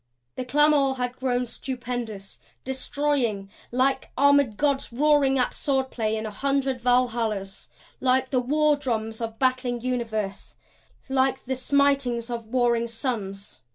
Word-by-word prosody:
The 255 - -3
clamor 285 0 +3
had 250 -1 -3
grown 250 -1 0
stupendous, 240 -5 -5 0.2
destroying 260 -6 -1 0.2
like 260 +2 +1
armored 280 -6 +4
Gods 280 -3 0
roaring 280 +1 +3
at 250 - +1
sword 265 -2 -1
play 220 -2 -1
in 220 - -4
a 215 - -4
hundred 270 +2 -1
Valhallas; 230 -5 0 0.3
like 260 0 +2
the 255 - +3
war 300 +4 +3
drums 225 -5 -3
of 225 -1 -4
battling 255 -1 +1
universe; 225 -5 -3 0.5
like 265 0 +1
the 260 - -1
smitings 260 -3 +1
of 230 -2 -5
warring 235 -1 +1
suns. 215 -5 -4
250 Hz, 130 wpm, -25 LUFS, 230-270 Hz, 0.5 s, armored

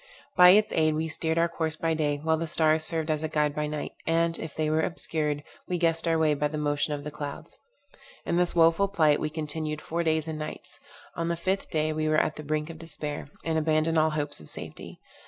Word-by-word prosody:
By 180 0 +9
its 210 +3 +5
aid 155 -1 +2
we 160 +1 -1
steered 160 0 -2
our 170 0 +4
course 160 -2 -2
by 165 +1 0
day, 150 -2 0
while 160 0 +2
the 165 +1 -3
stars 160 -1 +3
served 160 -1 0
as 155 -1 -1
a 155 - -1
guide 150 -1 0
by 150 0 -2
night; 150 0 -4 0.2
and, 165 0 +1
if 160 - -7
they 155 -1 0
were 155 +1 +2
obscured, 150 -3 -2 0.2
we 180 - -1
guessed 165 -1 +2
our 165 0 +3
way 155 -2 +3
by 150 +1 0
the 155 +1 -5
motion 145 0 0
of 145 - -7
the 150 - -6
clouds. 145 -1 -7 0.7
In - - 0
this 175 0 +2
woful 165 +4 +4
plight 155 -7 +3
we 155 - -1
continued 155 0 -3
four 170 +2 -3
days 160 -1 0
and 155 -1 -4
nights. 155 - -7 0.3
On 165 - -2
the 170 - 0
fifth 190 +3 -2
day 155 0 0
we 155 0 -1
were 155 - +3
at - - +1
the 155 - -8
brink 155 +2 -2
of 160 - -12
despair, 150 -3 -6 0.2
and 160 -1 +1
abandoned 155 +1 +2
all 155 0 +3
hopes 150 -1 -3
of 75 - -13
safety. - - -8
155 Hz, 235 wpm, -27 LUFS, 150-165 Hz, 0.7 s, By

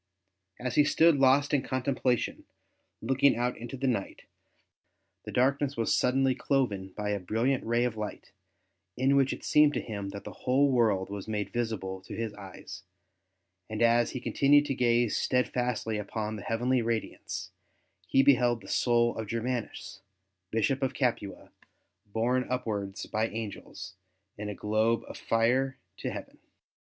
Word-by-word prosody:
As 125 -1 -3
he 150 - +5
stood 160 +1 +4
lost 140 +2 +4
in 140 - +3
contemplation, 130 -2 -1 0.6
looking 135 +4 +3
out 125 +1 0
into 120 +3 -7
the 135 - -3
night, 115 -7 -2 1.0
the - - -6
darkness 140 +2 +1
was 115 - +1
suddenly 135 +1 +2
cloven 125 -8 0
by 105 -1 -2
a 100 - -1
brilliant 115 +8 0
ray 120 +1 +1
of 125 -2 -1
light 105 -1 -6 0.7
in 135 +2 +3
which 135 -1 +3
it - - -6
seemed 150 -1 +5
to - - +1
him 100 -3 -5
that 100 0 -8
the - - -7
whole 135 +2 +2
world 105 -6 +2
was 100 0 -6
made 105 -2 -3
visible 105 -6 -3
to - - -9
his 115 -2 -3
eyes, 95 -2 -10 0.9
and 110 +1 -1
as 120 0 +4
he 130 - -5
con - - -5
tinued 145 +1 +5
to 140 - -1
gaze 120 -3 +2
steadfastly 125 -3 0
upon 105 +1 -4
the 105 - -7
heavenly 120 +3 +1
radiance, 115 -1 -3 0.6
he 135 - +4
beheld 120 -4 +4
the - - -13
soul 120 -1 +2
of 110 -1 -4
Germanus, 115 -2 -4 0.5
Bishop 120 +6 0
of 135 - -1
Capua, 120 -6 -2 0.6
borne 120 +5 0
upwards 105 -6 -3
by 110 +1 -1
angels 110 -4 -7 0.4
in 105 0 -5
a 105 - -5
globe 110 +4 +1
of - - -8
fire 130 +4 +1 0.2
to - - -3
heaven. - - -8
120 Hz, 155 wpm, -29 LUFS, 110-130 Hz, 1.0 s, he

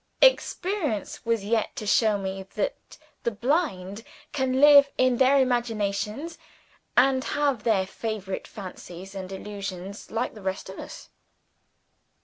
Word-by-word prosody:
Experience 365 - +1
was 230 -3 +1
yet 220 0 0
to 215 - -5
show 215 0 +3
me 195 -1 -4
that - - -3 0.2
the - - +1
blind 225 - -1 0.3
can 265 -2 0
live 285 -1 +8
in 255 -1 +3
their 265 +2 +5
imaginations, 235 +3 -1 0.6
and 260 +1 +4
have 285 -6 0
their 210 -4 +2
favorite 195 -1 -5
fancies 185 -1 -9
and 190 -1 -6
illusions 195 -1 -6
like 230 +3 -2
the 215 - -11
rest 190 0 -3
of 190 - -8
us. - - -9
220 Hz, 130 wpm, -26 LUFS, 195-265 Hz, 0.6 s, live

